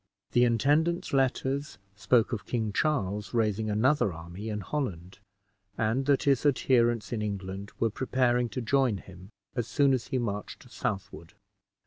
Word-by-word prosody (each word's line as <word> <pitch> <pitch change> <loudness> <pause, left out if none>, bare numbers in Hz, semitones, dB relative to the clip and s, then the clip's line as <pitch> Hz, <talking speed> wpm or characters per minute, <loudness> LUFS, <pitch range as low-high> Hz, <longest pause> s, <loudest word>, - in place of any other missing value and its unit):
The 120 0 +4
intendant's 150 - +1
letters 135 +2 0 0.2
spoke 115 +3 +2
of 110 - -4
King 110 -4 -1
Charles 105 -9 -1
raising 110 -1 +1
another 110 +1 +2
army 85 +6 -7
in 105 -1 -3
Holland, 95 - -4 0.6
and 115 +5 0
that 140 -2 +3
his 140 -3 +3
adherents 120 -5 +2
in 110 - -2
England 100 -1 -4
were 115 -1 +1
preparing 125 0 +1
to 130 - -4
join 125 -2 +2
him 95 0 -13 0.3
as 120 -4 -1
soon 140 -2 +3
at 130 - +1
he 130 - -3
marched 105 -5 -4
southward. 100 -3 -5
115 Hz, 145 wpm, -28 LUFS, 105-135 Hz, 0.6 s, The